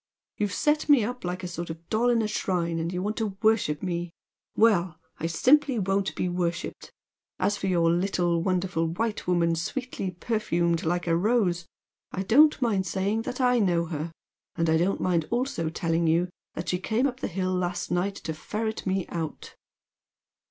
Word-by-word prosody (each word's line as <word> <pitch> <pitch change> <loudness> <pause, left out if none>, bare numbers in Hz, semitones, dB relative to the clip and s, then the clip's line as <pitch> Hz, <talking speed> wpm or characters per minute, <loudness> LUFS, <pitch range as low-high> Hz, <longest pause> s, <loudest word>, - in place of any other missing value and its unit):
You've 205 -1 0
set 300 +1 +1
me 280 -6 +6
up 250 +3 -4
like 180 +1 -3
a - - -2
sort 170 0 -5
of 165 +1 -8
doll 235 +3 +2
in 235 -2 +3
a - - 0
shrine 175 -5 -1
and 165 +1 -2
you 180 0 -2
want 210 +2 -2
to 210 -4 -2
worship 205 -9 +2
me 175 -1 -2 0.5
well! 185 -7 +3 0.2
I 165 - -1
simply 265 - +3
won't 195 -1 0
be - - -1
worshipped. 175 -1 -3 0.5
As 205 - +1
for 195 - -3
your 170 -3 +3
'little 175 -1 +1
wonderful 180 -2 0
white 210 +6 -2
woman 170 -2 +2
sweetly 200 - -3
perfumed 175 -4 0
like 175 +2 0
a 165 -1 +2
rose,' 180 -3 +1 0.4
I 190 - -2
don't 295 +10 +5
mind 200 -5 +1
saying 200 +5 0
that 250 - -6
I 250 -1 +3
know 175 -5 +2
her. 160 0 -4 0.4
And 165 -1 +1
I 160 - +4
don't 180 +4 +1
mind 170 -4 +1
also 240 - -1
telling 165 0 0
you 170 +3 +2 0.3
that 165 - -4
she 180 - 0
came 220 +7 0
up 255 -2 -1
the - - -2
hill 185 0 -1
last 180 -1 -2
night 185 +3 0
to 160 - -5
ferret 220 +7 -4
me 190 -1 0
out." 160 -3 -5
185 Hz, 185 wpm, -27 LUFS, 170-215 Hz, 0.5 s, me